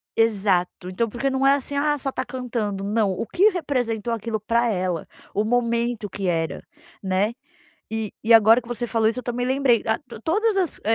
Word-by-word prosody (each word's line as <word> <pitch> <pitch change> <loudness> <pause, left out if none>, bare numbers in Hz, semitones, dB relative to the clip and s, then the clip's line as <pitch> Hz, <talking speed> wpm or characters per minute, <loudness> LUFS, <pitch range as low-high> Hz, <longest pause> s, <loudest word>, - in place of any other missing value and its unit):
exato 195 -5 +1
então 225 +5 -1
porque 245 +5 -1
não 265 0 0
é 275 - +6
assim, 285 0 -5
ah, 295 +1 +1
só 275 0 -3
está 260 -1 -3
cantando, 235 -6 -3
não, 210 0 +1
o 185 - -3
que 385 - +4
representou 245 - -2
aquilo 225 0 -3
para 230 +3 +1
ela, 180 -4 -2 0.3
o 205 - +1
momento 235 -1 0
que 195 0 -4
era, 165 -4 -1 0.4
né, 195 +3 0 0.6
e 220 -2 -3
e 230 - +4
agora 225 +1 +7
que 235 - -15
você 240 0 -2
falou 225 -1 +1
isso 230 - -2
eu - - -4
também 245 0 -2
lembrei, 260 -3 +3
ah, 220 - +1 0.3
todas 420 +6 +1
as 365 -5 0
230 Hz, 190 wpm, -23 LUFS, 210-255 Hz, 0.6 s, agora